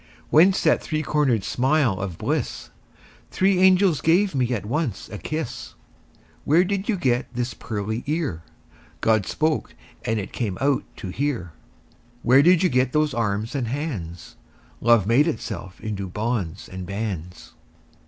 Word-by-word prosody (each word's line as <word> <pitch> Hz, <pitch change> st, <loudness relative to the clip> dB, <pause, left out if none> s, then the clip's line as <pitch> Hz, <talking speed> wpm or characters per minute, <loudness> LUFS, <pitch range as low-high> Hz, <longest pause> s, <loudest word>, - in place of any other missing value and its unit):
Whence 185 Hz, +6 st, +5 dB
that -, -, +3 dB
three 155 Hz, -1 st, -2 dB
cornered 140 Hz, -8 st, +1 dB
smile 130 Hz, -3 st, +1 dB
of 95 Hz, -4 st, -4 dB
bliss? -, -, -3 dB, 0.6 s
Three 190 Hz, -1 st, +2 dB
angels 185 Hz, -4 st, +4 dB
gave 185 Hz, +4 st, +3 dB
me 130 Hz, -3 st, 0 dB
at 105 Hz, -5 st, -2 dB
once 125 Hz, -, -2 dB
a 105 Hz, -, -7 dB
kiss. 125 Hz, -, -5 dB, 0.7 s
Where 165 Hz, +5 st, +4 dB
did 200 Hz, +2 st, -2 dB
you 210 Hz, -, +2 dB
get 125 Hz, -8 st, 0 dB
this 120 Hz, -1 st, -2 dB
pearly 110 Hz, +1 st, -4 dB
ear? 150 Hz, -, -1 dB, 0.6 s
God 110 Hz, -3 st, +2 dB
spoke, 155 Hz, -1 st, -1 dB, 0.3 s
and 110 Hz, 0 st, 0 dB
it 100 Hz, -, -6 dB
came 105 Hz, -7 st, -2 dB
out 140 Hz, +1 st, +1 dB
to 95 Hz, -, -7 dB
hear. 120 Hz, -, -2 dB, 0.7 s
Where 130 Hz, +3 st, +6 dB
did 175 Hz, +3 st, +5 dB
you 185 Hz, -, +4 dB
get 130 Hz, -1 st, +1 dB
those 150 Hz, -2 st, +2 dB
arms 110 Hz, 0 st, -1 dB
and 130 Hz, -5 st, -2 dB
hands? 110 Hz, -, -5 dB, 0.4 s
Love 115 Hz, -4 st, +4 dB
made 125 Hz, +9 st, +4 dB
itself 100 Hz, -, -5 dB
into 105 Hz, -3 st, -4 dB
bonds 105 Hz, -3 st, -3 dB
and 95 Hz, -1 st, -7 dB
bands. 95 Hz, -4 st, -5 dB
125 Hz, 150 wpm, -23 LUFS, 105-155 Hz, 0.7 s, Where